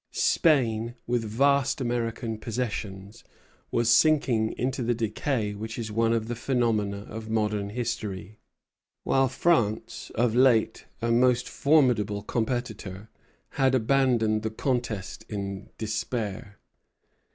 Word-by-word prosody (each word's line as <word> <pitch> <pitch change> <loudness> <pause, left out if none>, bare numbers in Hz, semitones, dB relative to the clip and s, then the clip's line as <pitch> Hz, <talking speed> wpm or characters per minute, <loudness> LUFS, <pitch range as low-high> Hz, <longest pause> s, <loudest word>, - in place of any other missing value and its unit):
Spain, 120 -7 +2
with 120 -1 0
vast 140 +6 +2
American 115 -2 -2
possessions, 105 -4 -5 0.5
was 120 -1 0
sinking 120 -3 +4
into 130 +2 -1
the 120 0 +1
decay 110 0 -1
which 110 +2 -6
is 110 -2 -4
one 115 +1 +2
of 115 -1 0
the 120 - -2
phenomena 115 -5 0
of 110 0 -7
modern 105 -2 0
history; 105 -3 -4 0.6
while 135 0 +3
France, 120 -6 0
of 115 0 +2
late 120 -3 +3 0.2
a 115 - +1
most 125 +1 +3
formidable 125 -9 +2
competitor, 110 -4 -3 0.4
had 130 -1 +2
abandoned 120 -3 +2
the 110 - -2
contest 110 -4 -3
in 100 -2 -5
despair. 110 -2 -4
115 Hz, 115 wpm, -27 LUFS, 110-125 Hz, 0.6 s, sinking